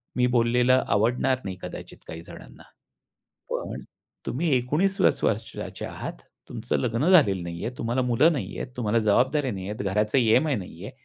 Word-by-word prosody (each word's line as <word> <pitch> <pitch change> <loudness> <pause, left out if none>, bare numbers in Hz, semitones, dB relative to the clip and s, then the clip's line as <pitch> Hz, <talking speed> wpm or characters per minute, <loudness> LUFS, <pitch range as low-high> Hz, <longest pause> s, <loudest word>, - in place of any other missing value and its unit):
मी 125 -1 +3
बोललेलं 125 +2 +3
आवडणार 120 +5 +2
नाही 95 - -4
कदाचित - - -8
काही 80 +1 -7
जणांना. - - -13 0.9
पण - - -4 0.4
तुम्ही 155 +4 -1
19 155 +11 0
प्लस 190 - +2
वर्षाचे 110 +1 -3
आहात, - - -6 0.4
तुमचं - - -2
लग्न 125 +8 0
झालेलं 100 - +5
नाहीये, 85 +5 -4
तुम्हाला 120 +3 -1
मुलं 125 +7 +3
नाहीयेत, 135 -2 -4
तुम्हाला 115 -1 +1
जबाबदाऱ्या 130 +6 +2
नाहीयेत, 95 +1 -5
घराचे 105 +5 +1 0.2
E-M-I 155 -3 +2
नाही 90 -1 -10
आहे. 115 - -7
120 Hz, 145 wpm, -25 LUFS, 105-135 Hz, 0.9 s, झालेलं